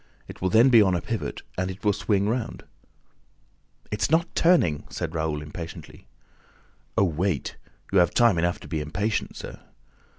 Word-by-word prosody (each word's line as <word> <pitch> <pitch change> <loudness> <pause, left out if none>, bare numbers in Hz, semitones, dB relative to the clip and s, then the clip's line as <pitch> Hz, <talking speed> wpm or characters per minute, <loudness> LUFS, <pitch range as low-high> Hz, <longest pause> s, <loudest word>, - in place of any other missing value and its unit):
It - - -11
will 95 - +1
then 115 +6 +6
be 115 -3 +7
on 95 -3 +3
a - - 0
pivot 115 -2 -4 0.2
and 95 0 -2
will 105 -1 +3
swing 100 +1 0
round." 115 +1 -3 1.3
"It's 105 - 0
not 165 +2 +1
turning!" 160 - +3
said 85 -1 -4
Raoul 80 -2 -2
impatiently. 80 +2 -9 0.9
"Oh, - - +5
wait! 85 -3 -1 0.4
You 100 - +6
have 85 - +5
time 115 -8 +4
enough 85 +1 0
to - - -10
be 80 0 -2
impatient, 100 +9 -2
sir! - - -8
95 Hz, 160 wpm, -25 LUFS, 85-110 Hz, 1.3 s, be